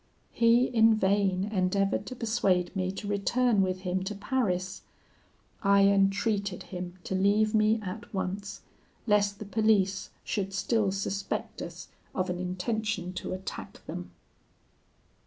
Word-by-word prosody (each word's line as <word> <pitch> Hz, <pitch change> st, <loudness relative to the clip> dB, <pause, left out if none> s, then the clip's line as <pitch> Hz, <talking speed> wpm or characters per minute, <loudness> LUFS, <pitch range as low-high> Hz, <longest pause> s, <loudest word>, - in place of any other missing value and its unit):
He, 235 Hz, +1 st, +4 dB
in 225 Hz, -2 st, +4 dB
vain, 195 Hz, -2 st, +2 dB
endeavoured 195 Hz, +1 st, +1 dB
to 255 Hz, -, -6 dB
persuade 215 Hz, -6 st, +1 dB
me 185 Hz, -1 st, 0 dB
to 205 Hz, -, -6 dB
return 210 Hz, +2 st, +2 dB
with 185 Hz, -1 st, -1 dB
him 185 Hz, 0 st, -1 dB
to 210 Hz, +2 st, -3 dB
Paris. 195 Hz, -5 st, -1 dB, 0.8 s
I 200 Hz, -1 st, +5 dB
entreated 200 Hz, 0 st, +2 dB
him 180 Hz, -1 st, -7 dB
to -, -, -4 dB
leave 205 Hz, +3 st, +3 dB
me 215 Hz, +1 st, +3 dB
at 200 Hz, +3 st, -7 dB
once, 195 Hz, 0 st, -4 dB, 0.4 s
lest 205 Hz, -2 st, +2 dB
the 215 Hz, -, -7 dB
police 200 Hz, -2 st, +2 dB
should 195 Hz, -2 st, -2 dB
still 200 Hz, +1 st, +1 dB
suspect 195 Hz, 0 st, -3 dB
us -, -, -8 dB, 0.3 s
of 185 Hz, -1 st, 0 dB
an 180 Hz, -, -4 dB
intention 185 Hz, +1 st, -2 dB
to 185 Hz, -, -4 dB
attack 185 Hz, +1 st, -7 dB
them." -, -, -6 dB
200 Hz, 135 wpm, -29 LUFS, 185-215 Hz, 0.8 s, I